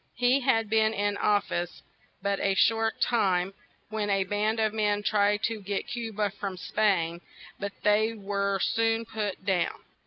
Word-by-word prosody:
He 250 Hz, +2 st, +3 dB
had 225 Hz, -4 st, +2 dB
been 220 Hz, +1 st, +2 dB
in 205 Hz, 0 st, 0 dB
of 205 Hz, -1 st, +2 dB
fice 175 Hz, 0 st, -4 dB, 0.4 s
but 200 Hz, 0 st, 0 dB
a 195 Hz, -1 st, +1 dB
short 225 Hz, +2 st, +2 dB
time, 190 Hz, -5 st, +1 dB, 0.4 s
when 215 Hz, -1 st, -2 dB
a 195 Hz, -1 st, +2 dB
band 210 Hz, +3 st, 0 dB
of 215 Hz, -1 st, +1 dB
men 210 Hz, -1 st, 0 dB
tried 205 Hz, 0 st, +2 dB
to 225 Hz, -2 st, -1 dB
get 200 Hz, +1 st, -3 dB
Cu 235 Hz, -2 st, -4 dB
ba 210 Hz, -1 st, -1 dB
from 195 Hz, -2 st, -5 dB
Spain; 175 Hz, -5 st, 0 dB, 0.4 s
but 200 Hz, 0 st, -4 dB
they 215 Hz, +2 st, +3 dB
were 200 Hz, -1 st, -1 dB
soon 225 Hz, +1 st, +1 dB
put 210 Hz, -4 st, -4 dB
down. 190 Hz, -3 st, 0 dB
205 Hz, 165 wpm, -28 LUFS, 200-220 Hz, 0.4 s, He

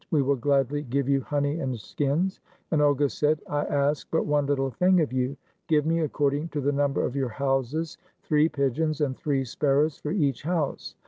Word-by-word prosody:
We 150 Hz, -4 st, +2 dB
will 140 Hz, +1 st, +2 dB
gladly 140 Hz, +2 st, +1 dB
give 140 Hz, 0 st, -1 dB
you 140 Hz, -1 st, +2 dB
honey 145 Hz, +3 st, -1 dB
and 130 Hz, -6 st, -3 dB
skins." 150 Hz, -, -1 dB, 0.3 s
And 155 Hz, -3 st, +2 dB
Olga 145 Hz, -1 st, +3 dB
said, 150 Hz, +2 st, 0 dB
"I 145 Hz, 0 st, -1 dB
ask 145 Hz, 0 st, 0 dB
but 160 Hz, -, 0 dB
one 145 Hz, -1 st, +1 dB
little 135 Hz, -2 st, 0 dB
thing 180 Hz, +8 st, +3 dB
of 155 Hz, -5 st, 0 dB
you; 130 Hz, +2 st, -1 dB, 0.3 s
give 150 Hz, -3 st, +2 dB
me, 165 Hz, +1 st, +1 dB
accord 145 Hz, -3 st, +1 dB
ing 150 Hz, +3 st, -2 dB
to 150 Hz, -, -1 dB
the 140 Hz, +1 st, +1 dB
number 140 Hz, -1 st, +1 dB
of 125 Hz, -, -4 dB
your 135 Hz, -3 st, 0 dB
houses, 135 Hz, +6 st, -2 dB, 0.2 s
three 150 Hz, +1 st, +3 dB
pigeons 150 Hz, +2 st, -1 dB
and 135 Hz, -3 st, 0 dB
three 135 Hz, -2 st, -1 dB
sparrows 145 Hz, +4 st, +1 dB
for 150 Hz, -, -5 dB
each 145 Hz, -, 0 dB
house. 160 Hz, -2 st, -2 dB
145 Hz, 200 wpm, -26 LUFS, 135-150 Hz, 0.3 s, Olga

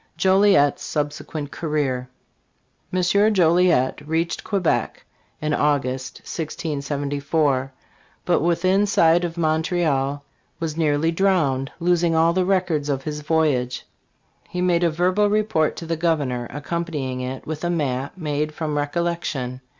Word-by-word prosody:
JOLIET'S 190 Hz, -6 st, +4 dB
SUBSEQUENT 145 Hz, 0 st, -4 dB
CAREER. 140 Hz, -6 st, -2 dB, 0.8 s
M. 185 Hz, -, +1 dB, 0.3 s
Joliet 170 Hz, -7 st, +3 dB
reached 165 Hz, +2 st, -1 dB
Quebec 195 Hz, -6 st, -1 dB, 0.3 s
in 155 Hz, 0 st, -1 dB
August, 135 Hz, -3 st, -1 dB
1674, 145 Hz, -3 st, -2 dB, 0.5 s
but -, -, +2 dB
within 185 Hz, +5 st, +2 dB
sight 170 Hz, -3 st, +4 dB
of 170 Hz, 0 st, -3 dB
Montreal 155 Hz, -4 st, 0 dB, 0.3 s
was 160 Hz, -2 st, -3 dB
nearly 155 Hz, 0 st, +1 dB
drowned, 165 Hz, -8 st, +1 dB
losing 170 Hz, -1 st, +2 dB
all 165 Hz, +1 st, +4 dB
the 185 Hz, 0 st, +1 dB
records 180 Hz, -6 st, 0 dB
of 135 Hz, -1 st, -1 dB
his 150 Hz, 0 st, -4 dB
voyage. 145 Hz, -5 st, 0 dB, 0.6 s
He 180 Hz, -, -4 dB
made 180 Hz, -1 st, +2 dB
a 170 Hz, -, +4 dB
verbal 185 Hz, +5 st, +2 dB
report 210 Hz, -7 st, +1 dB
to 165 Hz, -, -7 dB
the 165 Hz, 0 st, -2 dB
Governor, 145 Hz, -8 st, 0 dB
accompanying 145 Hz, -3 st, -3 dB
it 130 Hz, +1 st, -5 dB
with 155 Hz, +1 st, -5 dB
a 175 Hz, -, 0 dB
map 140 Hz, -3 st, -2 dB
made 150 Hz, -2 st, -2 dB
from 150 Hz, -2 st, -2 dB
recollection. 145 Hz, -5 st, -2 dB
155 Hz, 125 wpm, -22 LUFS, 145-170 Hz, 0.8 s, JOLIET'S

